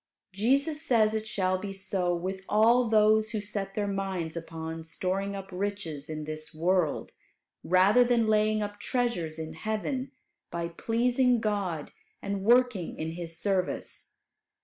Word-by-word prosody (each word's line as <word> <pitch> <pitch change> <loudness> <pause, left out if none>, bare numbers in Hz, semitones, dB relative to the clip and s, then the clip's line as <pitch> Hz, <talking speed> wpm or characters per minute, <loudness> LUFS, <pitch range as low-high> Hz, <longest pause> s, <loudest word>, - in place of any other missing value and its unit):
Jesus 275 - +1
says 225 -8 +3
it 220 0 -2
shall 185 -3 0
be 200 0 -5
so 190 -2 -1
with 190 +2 -4
all 230 +3 +4
those 215 0 +4
who 215 - -2
set 200 -1 -4
their 210 - 0
minds 195 -5 -2
upon 165 -1 -6
storing 190 +4 -2
up 195 -1 -6
riches 180 -6 -4
in 155 -1 -4
this 155 +1 -7
world, 170 -1 +1 0.5
rather 190 +7 +5
than 240 -2 +3
laying 215 0 +2
up 205 0 -6
treasures 210 -11 -1
in 160 0 -5
heaven 220 - -3 0.4
by 170 0 -3
pleasing 240 +6 +2
God 200 -7 -2 0.3
and 200 -1 -3
working 240 -4 +3
in 160 +1 -3
His 165 -1 -7
service. 185 +1 -2
195 Hz, 145 wpm, -29 LUFS, 170-220 Hz, 0.5 s, rather